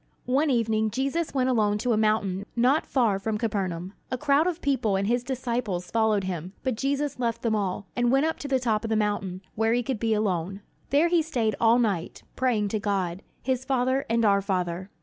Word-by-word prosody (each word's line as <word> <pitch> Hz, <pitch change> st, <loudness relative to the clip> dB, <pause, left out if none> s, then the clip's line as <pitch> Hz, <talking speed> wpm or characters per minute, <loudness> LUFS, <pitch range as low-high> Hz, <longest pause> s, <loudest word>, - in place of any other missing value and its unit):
One 280 Hz, +5 st, +2 dB
evening 220 Hz, -3 st, +1 dB
Jesus 275 Hz, +7 st, -2 dB
went 260 Hz, -1 st, +2 dB
alone 210 Hz, -4 st, +2 dB
to 240 Hz, +3 st, 0 dB
a -, -, +3 dB
mountain 210 Hz, -3 st, 0 dB
not 255 Hz, +6 st, +2 dB
far 225 Hz, -7 st, +2 dB
from 215 Hz, +2 st, -2 dB
Capernaum. 190 Hz, -5 st, -2 dB, 0.2 s
A 255 Hz, -, -2 dB
crowd 295 Hz, +4 st, +3 dB
of 355 Hz, -2 st, -2 dB
people 260 Hz, -, +1 dB
and 195 Hz, +1 st, 0 dB
his 240 Hz, +3 st, +1 dB
disciples 240 Hz, -8 st, -3 dB
followed 220 Hz, -3 st, +2 dB
him; 180 Hz, -1 st, -4 dB
but 260 Hz, -, 0 dB
Jesus 275 Hz, +3 st, -1 dB
left 235 Hz, -2 st, -1 dB
them 230 Hz, -2 st, +1 dB
all, 200 Hz, -1 st, -2 dB
and 245 Hz, 0 st, +2 dB
went 270 Hz, +3 st, +3 dB
up 320 Hz, -, -1 dB
to 285 Hz, -, -5 dB
the 270 Hz, -1 st, +2 dB
top 225 Hz, -3 st, 0 dB
of 225 Hz, -, -3 dB
the 220 Hz, -, +1 dB
mountain, 205 Hz, -3 st, -1 dB
where 225 Hz, +1 st, +1 dB
he 245 Hz, 0 st, +1 dB
could 260 Hz, -3 st, -3 dB
be 225 Hz, -1 st, +1 dB
alone. 195 Hz, -2 st, -1 dB, 0.3 s
There 300 Hz, +5 st, +3 dB
he 345 Hz, -1 st, +4 dB
stayed 245 Hz, -9 st, 0 dB
all 230 Hz, +1 st, +5 dB
night, 200 Hz, -8 st, -1 dB
praying 230 Hz, -5 st, +1 dB
to 215 Hz, -, -1 dB
God, 195 Hz, -3 st, -1 dB, 0.2 s
his 260 Hz, -1 st, 0 dB
Father 260 Hz, 0 st, 0 dB
and 230 Hz, 0 st, +2 dB
our 200 Hz, -1 st, +4 dB
Father. 185 Hz, -1 st, -2 dB
225 Hz, 210 wpm, -26 LUFS, 200-260 Hz, 0.3 s, all